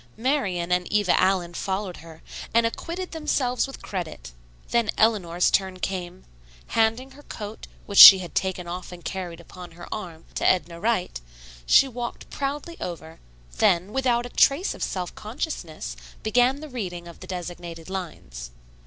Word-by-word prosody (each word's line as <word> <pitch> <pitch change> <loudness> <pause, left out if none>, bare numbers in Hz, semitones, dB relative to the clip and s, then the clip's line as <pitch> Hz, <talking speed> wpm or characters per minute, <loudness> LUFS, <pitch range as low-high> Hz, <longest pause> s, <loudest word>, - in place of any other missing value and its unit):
Marian 210 -9 -1
and 180 0 0
Eva 205 -3 +3
Allen 185 -2 +1
followed 190 0 -3
her, 160 0 -13 0.3
and 230 0 +5
acquitted 340 +10 -4
themselves 280 -6 0
with 270 - -11
credit. 160 - -6 0.4
Then 235 -3 +2
Eleanor's 185 -6 +2
turn 190 -1 +1
came. 185 -1 -5 0.4
Handing 225 +4 +1
her 290 - -15
coat, 215 -6 -8 0.2
which 200 - +1
she 195 - +14
had 180 -2 -8
taken 185 -2 -2
off 180 +2 -6
and 175 -1 -11
carried 175 -3 -5
upon 175 0 -12
her 175 +1 -11
arm, 170 -6 -7
to - - -3
Edna 170 -2 +2
Wright, 190 - -1 0.5
she 275 - +6
walked 240 -1 -6
proudly 290 +4 -4
over, 165 -2 -7 0.4
then, 180 +4 +2
without 245 -3 +1
a - - -7
trace 285 +10 +3
of - - -12
self 180 -2 -3
consciousness, 210 - -5 0.3
began 245 +5 +2
the 310 - -8
reading 180 -9 -5
of 170 - -12
the 185 - -11
designated 175 -2 -7
lines. 110 - -7
190 Hz, 155 wpm, -25 LUFS, 175-240 Hz, 0.5 s, she